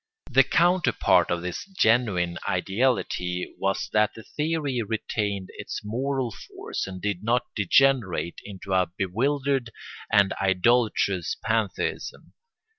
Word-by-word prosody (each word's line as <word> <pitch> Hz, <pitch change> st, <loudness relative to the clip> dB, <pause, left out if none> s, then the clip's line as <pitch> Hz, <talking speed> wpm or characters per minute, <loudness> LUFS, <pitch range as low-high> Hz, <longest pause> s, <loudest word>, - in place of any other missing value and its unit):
The 135 Hz, +2 st, +7 dB
counterpart 135 Hz, -, +3 dB
of 85 Hz, 0 st, -1 dB
this 90 Hz, 0 st, -4 dB
genuine 110 Hz, -, +1 dB
ideality 95 Hz, -3 st, -1 dB
was 95 Hz, +2 st, -1 dB
that 105 Hz, 0 st, +2 dB
the 110 Hz, -, -10 dB
theory 150 Hz, -4 st, -2 dB
retained 105 Hz, -3 st, -3 dB
its -, -, -5 dB
moral 130 Hz, +3 st, -2 dB
force -, -, -6 dB
and 95 Hz, -1 st, -7 dB
did 100 Hz, -1 st, -3 dB
not 120 Hz, +2 st, 0 dB
degenerate 105 Hz, -4 st, +2 dB
into 95 Hz, -1 st, -6 dB
a 90 Hz, -1 st, +3 dB
bewildered 130 Hz, +6 st, 0 dB, 0.4 s
and 100 Hz, -1 st, +4 dB
idolatrous 100 Hz, -1 st, +2 dB
pantheism. 110 Hz, -3 st, -2 dB
105 Hz, 115 wpm, -25 LUFS, 95-130 Hz, 0.4 s, The